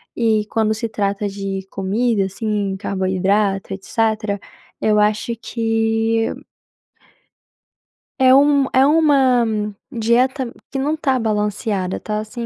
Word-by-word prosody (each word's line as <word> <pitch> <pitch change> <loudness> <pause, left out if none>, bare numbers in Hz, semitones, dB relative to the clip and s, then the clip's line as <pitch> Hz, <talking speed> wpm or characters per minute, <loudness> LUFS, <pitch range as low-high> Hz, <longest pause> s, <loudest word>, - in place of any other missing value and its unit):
e, 220 -3 +1
quando 220 -1 +1
se 220 +1 -3
trata 205 -1 -1
de 195 -1 -5
comida, 200 +2 0
assim, 200 0 -2
carboidrato 195 +1 0
etc, 215 +1 -1 0.4
eu 215 -1 +2
acho 210 +2 +1
que 225 0 0 1.9
É 260 -1 +6
um 280 0 +5
é 260 +1 +5
uma 280 -5 +4 0.5
dieta 245 +2 +1 0.2
que 275 - -3
não 285 +3 0
está 270 -4 0
balanceada, 210 -3 -1
tá 210 0 -3
assim, 225 +2 -6
220 Hz, 110 wpm, -19 LUFS, 200-240 Hz, 1.9 s, É